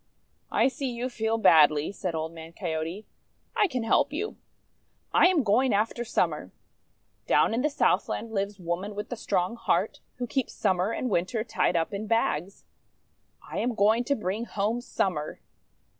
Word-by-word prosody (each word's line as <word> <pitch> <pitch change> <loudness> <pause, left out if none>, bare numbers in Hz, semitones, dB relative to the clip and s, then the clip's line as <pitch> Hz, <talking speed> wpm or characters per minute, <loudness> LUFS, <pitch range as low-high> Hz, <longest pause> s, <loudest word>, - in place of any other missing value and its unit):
"I - - +4
see 275 0 -3
you 245 +1 -3
feel 225 -2 -1
badly," 155 -7 +5
said 185 -4 -4
Old 160 +1 -3
Man 165 0 -10
Coyote. 165 +3 -4 0.5
"I 415 - +4
can 255 -8 -3
help 275 +5 +2
you. 410 +9 -3 0.8
I - - +7
am 355 -6 +3
going 230 +2 +3
after 225 +3 0
Summer. 235 - -1 0.8
Down - - +4
in 235 - +1
the 300 - +2
Southland 255 -5 0
lives 200 -1 -2
Woman 180 +4 -3
with 210 +1 -5
the 245 - -3
Strong 195 -1 -1
Heart, 230 - 0 0.2
who 245 - -3
keeps 255 +1 -2
Summer 190 0 +1
and 255 - -2
Winter 200 +6 0
tied 215 -5 0
up 165 +4 0
in 205 +2 -4
bags. 195 -5 0 0.8
I - - -4
am 240 0 -1
going 220 +3 +3
to 280 - +1
bring 210 +1 -3
home 215 +2 -1
Summer." 175 -10 -2
215 Hz, 165 wpm, -27 LUFS, 180-240 Hz, 0.8 s, I